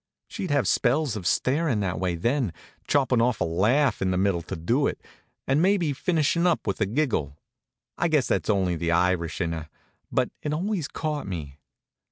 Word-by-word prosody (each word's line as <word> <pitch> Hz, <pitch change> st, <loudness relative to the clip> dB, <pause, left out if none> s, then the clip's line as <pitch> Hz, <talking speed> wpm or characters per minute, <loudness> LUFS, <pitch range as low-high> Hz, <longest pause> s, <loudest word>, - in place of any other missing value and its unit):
She'd 185 Hz, -, -5 dB
have 145 Hz, -8 st, +2 dB
spells 135 Hz, +4 st, +2 dB
of 95 Hz, -4 st, -3 dB
starin' 135 Hz, -, +1 dB
that 90 Hz, -5 st, -2 dB
way 90 Hz, -2 st, 0 dB
then, 120 Hz, -, 0 dB, 0.3 s
'choppin' 130 Hz, -4 st, +2 dB
off 120 Hz, -1 st, +1 dB
a -, -, +2 dB
laugh 105 Hz, -, +2 dB
in 95 Hz, -, +1 dB
the 90 Hz, -, 0 dB
middle 95 Hz, -2 st, +1 dB
to 95 Hz, -, -6 dB
do 120 Hz, -, +1 dB
it, -, -, -3 dB, 0.5 s
and 135 Hz, +3 st, +2 dB
maybe 180 Hz, -5 st, +2 dB
finishin' 170 Hz, +2 st, +1 dB
up 170 Hz, -, +1 dB
with 100 Hz, 0 st, -2 dB
a 105 Hz, -, +2 dB
giggle. 105 Hz, -, -1 dB, 0.6 s
I 175 Hz, -, +2 dB
guess 150 Hz, -5 st, +2 dB
that's -, -, 0 dB
only 95 Hz, -4 st, +2 dB
the 85 Hz, +1 st, -2 dB
Irish 85 Hz, -1 st, +1 dB
in 85 Hz, -1 st, 0 dB
her, 80 Hz, -2 st, -5 dB, 0.4 s
but -, -, +1 dB
it 150 Hz, -, -2 dB
always 180 Hz, -1 st, -1 dB
caught 150 Hz, -1 st, -3 dB
me. 75 Hz, -6 st, -6 dB
115 Hz, 190 wpm, -26 LUFS, 90-150 Hz, 0.6 s, have